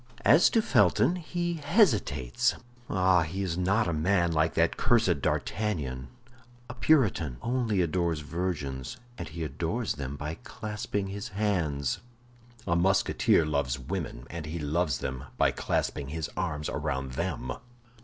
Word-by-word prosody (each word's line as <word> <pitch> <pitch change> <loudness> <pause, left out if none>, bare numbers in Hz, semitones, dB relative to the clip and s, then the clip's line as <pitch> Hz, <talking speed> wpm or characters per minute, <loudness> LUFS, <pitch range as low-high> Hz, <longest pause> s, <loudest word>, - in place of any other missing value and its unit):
As 155 +5 +7
to 225 - +2
Felton, 180 - +3
he 175 -1 -3
hesitates. 105 - +2 0.3
Ah, 95 -1 +4
he 90 +5 -2
is 90 -3 -2
not 100 +5 +2
a 85 - 0
man 85 +2 +2
like 80 0 +1
that - - +2
cursed 105 - +2
D'Artagnan. 70 -15 -2 0.6
A - - -7
Puritan 110 - +2
only 120 -6 +1
adores 85 -2 0
virgins, 75 -5 -3 0.2
and 90 - -4
he 80 +1 -5
adores 85 - -2
them 70 -1 -5
by 75 +2 -5
clasping 105 -3 -4
his 100 +2 -5
hands. 85 -10 -1 0.7
A 85 - +1
Musketeer 90 -2 +3
loves 70 -4 0
women, 65 -3 -5
and 85 -3 -5
he 80 +2 -4
loves 75 -2 0
them 65 +2 -5
by - - +4
clasping 70 - -1
his 80 0 -4
arms 75 0 -2
round 70 -3 -2
them." 65 0 -3
85 Hz, 140 wpm, -28 LUFS, 75-100 Hz, 0.7 s, As